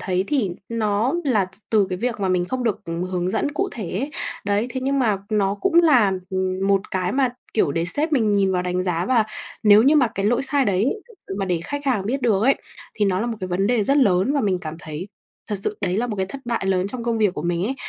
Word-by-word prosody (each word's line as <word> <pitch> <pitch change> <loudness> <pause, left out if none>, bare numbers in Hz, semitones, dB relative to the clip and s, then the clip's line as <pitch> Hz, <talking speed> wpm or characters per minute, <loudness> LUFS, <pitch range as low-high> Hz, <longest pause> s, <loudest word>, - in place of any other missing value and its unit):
thấy 185 0 0
thì 255 -10 +1 0.2
nó 225 +2 0
là 215 -8 +2
t - - -12 0.2
từ 210 -3 +4
cái 180 - -1
việc 235 -2 -2
mà 190 - 0
mình 180 -1 +1
không 255 +5 -3
được 220 - 0 0.3
hướng 180 0 -1
dẫn 290 - -1
cụ 390 +5 -1
thể 210 -8 -5
ấy. 265 +11 -3 0.3
Đấy, 205 +3 +1
thế 260 - -3
nhưng 275 +1 0
mà 215 -6 +2
nó 200 -2 +1
cũng 370 - 0
là, 245 -12 +5 0.2
ừm, 185 0 -1
một 195 -1 +4
cái 185 +1 -1
mà, 265 -2 +2 0.3
kiểu, 180 -10 +2
để 165 +3 0
sếp 300 - 0
mình 220 -6 +2
nhìn 195 -2 +2
vào 180 0 0
đánh 180 0 -1
giá 175 -1 -1
và 235 -4 +3 0.4
nếu 210 0 +7
như 295 +4 +5
mà 255 -5 +4
cái 200 +1 -1
lỗi 240 +4 +2
sai 275 0 +3
đấy 200 0 +1 0.2
thật 465 - -16
sự 190 - -4
mà 195 - 0
để 175 -2 0
khách 285 +8 -5
hàng 215 -7 +1
biết 265 +3 -2
được 215 -4 +2
ấy, 270 +3 +5 0.4
thì 210 - +1
nó 190 0 +1
là 235 - -1
một 230 - -3
cái 185 - -4
vấn 185 +2 0
đề 230 -1 +2
rất 275 +7 +2
lớn 200 -1 +3
và 285 - +1
mình 195 -4 +1
cảm 155 -1 -6
thấy 160 +4 -7 0.4
thật 205 - -1
sự 210 - -2
đấy 185 -2 0
là 240 +3 0
một 215 - -4
cái 190 -1 -1
thất 275 +7 -8
bại 235 -5 -2
lớn 190 -1 +1
trong 240 +1 -6
công 230 -1 0
việc 205 -4 +2
của - - -4
mình 170 +1 -1
ấy. 260 +6 -1
205 Hz, 270 wpm, -22 LUFS, 185-245 Hz, 0.4 s, nếu